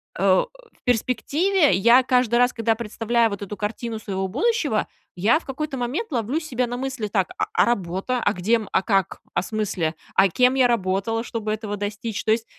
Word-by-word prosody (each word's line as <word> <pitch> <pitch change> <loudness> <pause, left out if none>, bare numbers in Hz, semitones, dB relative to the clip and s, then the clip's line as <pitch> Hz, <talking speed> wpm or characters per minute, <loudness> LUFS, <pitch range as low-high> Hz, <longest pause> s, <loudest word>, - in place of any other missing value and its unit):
а, 190 0 +4
в - - -23
перспективе 290 - +2
я 235 +7 +5
каждый 250 -2 +2
раз, 245 0 +3
когда 225 -1 +1
я - - -7
представляю 230 +1 0
вот 200 - -5
эту 200 +1 -6
картину 220 +3 -4
своего 190 -3 -3
будущего, 455 - 0 0.3
я 215 - +3
в - - -20
какой-то 280 +1 -4
момент 265 - -3
ловлю 245 +4 -1
себя 255 -6 -2
на 245 +1 -4
мысли: 260 -4 -3
"Так, 195 -2 0
а - - +2
а - - +4
работа? 200 +3 -1
а 205 - +2
где, 195 +5 +1
м, 220 -4 -3
а - - +2
как, 195 -3 0
а - - +1
смысле, 195 -6 -2 0.2
а 195 - +6
кем 250 +8 +3
я 260 -2 +5
работала, 225 0 0
чтобы 225 -3 -4
этого 210 -1 -4
достичь?" 205 +2 -4
Tо 220 - +2
есть, 225 +1 +1
225 Hz, 200 wpm, -23 LUFS, 205-250 Hz, 0.3 s, а